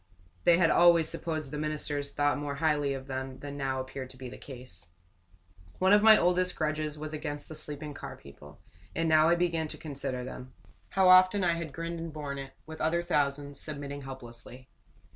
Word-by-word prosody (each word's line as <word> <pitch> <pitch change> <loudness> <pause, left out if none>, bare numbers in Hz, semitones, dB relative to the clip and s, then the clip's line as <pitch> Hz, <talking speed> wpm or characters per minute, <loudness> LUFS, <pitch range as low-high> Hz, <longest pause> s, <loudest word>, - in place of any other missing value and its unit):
They 170 - +6
had 170 -2 +4
always 170 -2 +6
supposed 155 -4 -3
the 150 - -4
ministers 150 -2 -2
thought 145 0 +1
more 145 -1 -3
highly 145 -2 +1
of 130 0 -7
them 130 -1 -5
than 145 0 -7
now 135 -2 -2
appeared 130 0 -6
to 130 - -12
be 130 -1 -7
the - - -9
case. 125 -10 -10 0.9
One 190 +2 +4
of 205 - +7
my 220 0 +8
oldest 180 +1 +2
grudges 155 -1 -1
was 155 +1 -5
against 145 -1 -5
the - - -8
sleeping 150 -1 -4
car - - -8
people; 75 +1 -14 0.4
and 165 0 0
now 155 0 +5
I 170 - +5
began 170 -2 0
to - - -6
consider 140 -4 -4
them. 130 0 -8 0.4
How 190 0 +3
often 185 +2 +7
I 170 -1 +3
had 165 -2 -4
grinned 165 +3 -5
and 165 0 -5
borne 145 -2 -5
it 135 -1 -8
with 160 0 -9
other 170 +2 +1
thousands 145 -4 -1
submitting 145 -1 -5
helplessly. 130 -1 -10
150 Hz, 195 wpm, -30 LUFS, 135-165 Hz, 0.9 s, my